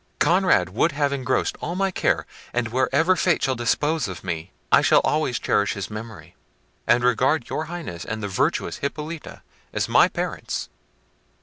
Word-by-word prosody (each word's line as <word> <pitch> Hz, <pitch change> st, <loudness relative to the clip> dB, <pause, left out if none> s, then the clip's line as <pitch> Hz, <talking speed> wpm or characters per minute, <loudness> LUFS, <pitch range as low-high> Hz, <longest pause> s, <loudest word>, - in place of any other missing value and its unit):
Conrad 180 Hz, +4 st, +3 dB
would 165 Hz, -, +1 dB
have 145 Hz, -1 st, 0 dB
engrossed 130 Hz, -2 st, -1 dB
all 170 Hz, +3 st, -3 dB
my 195 Hz, 0 st, +1 dB
care; -, -, 0 dB, 0.3 s
and 120 Hz, -1 st, 0 dB
wherever 135 Hz, +9 st, +2 dB
fate 175 Hz, -2 st, +1 dB
shall 135 Hz, -, +2 dB
dispose 140 Hz, +4 st, 0 dB
of 90 Hz, -2 st, -7 dB
me, 85 Hz, -3 st, -4 dB, 0.2 s
I -, -, +7 dB
shall -, -, +5 dB
always 150 Hz, -5 st, 0 dB
cherish 100 Hz, -, +1 dB
his 100 Hz, 0 st, -5 dB
memory, 110 Hz, +1 st, -9 dB, 0.5 s
and 120 Hz, +1 st, +4 dB
regard 125 Hz, +3 st, +2 dB
your 155 Hz, -, -2 dB
Highness 160 Hz, -, -6 dB
and 110 Hz, 0 st, -5 dB
the -, -, -1 dB
virtuous 95 Hz, -, 0 dB
Hippolita 150 Hz, +3 st, -6 dB, 0.3 s
as -, -, -1 dB
my -, -, +5 dB
parents." -, -, -4 dB
130 Hz, 165 wpm, -23 LUFS, 115-160 Hz, 0.5 s, I